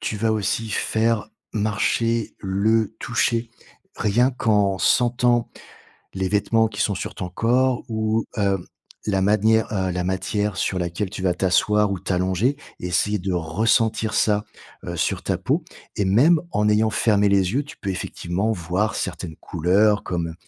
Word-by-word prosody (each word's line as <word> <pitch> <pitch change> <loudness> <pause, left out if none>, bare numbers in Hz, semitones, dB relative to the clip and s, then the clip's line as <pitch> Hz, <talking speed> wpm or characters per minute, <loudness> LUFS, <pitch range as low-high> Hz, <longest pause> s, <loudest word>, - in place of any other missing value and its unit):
Tu 110 - -3
vas 110 +1 +1
aussi 110 +1 -1
faire 110 +2 0 0.2
marcher 110 +2 0
le 105 +3 +1
toucher, 115 0 0 0.5
rien 120 +5 +2
qu'en 105 -6 +1
sentant 120 0 +2 0.6
les 95 -1 -2
vêtements 110 +3 +2
qui 110 0 -4
sont 100 - +1
sur - - -5
ton 90 - -5
corps 125 +6 +1
ou, 110 0 0
heu, 100 -3 0 0.4
la 95 -3 +1
manière, 110 +2 +2
heu, 95 -3 -1
la 90 0 -2
matière 95 +2 -1
sur 95 - -1
laquelle 90 +3 -2
tu 100 -2 -7
vas 90 -1 +2
t'asseoir 105 +3 +2
ou 95 - -3
t'allonger 95 +8 0 0.2
et 90 - -4
essayer 105 +4 +1
de 95 +1 -2
ressentir 110 +6 +1
ça, 105 -1 +2 0.4
heu, - - -4
sur - - -1
ta - - -1
peau - - -1 0.3
et 100 - +1
même 140 - +4
en 105 +1 +1
ayant 110 +1 +3
fermé 105 -2 +2
les 95 -2 +2
yeux 140 +3 +1
tu 145 - -12
peux 100 - -5
effectivement 95 +3 -2
voir 95 +2 -1
certaines 80 -3 -4
couleurs 100 +5 +2
comme 85 -2 -3
105 Hz, 160 wpm, -22 LUFS, 95-110 Hz, 0.6 s, même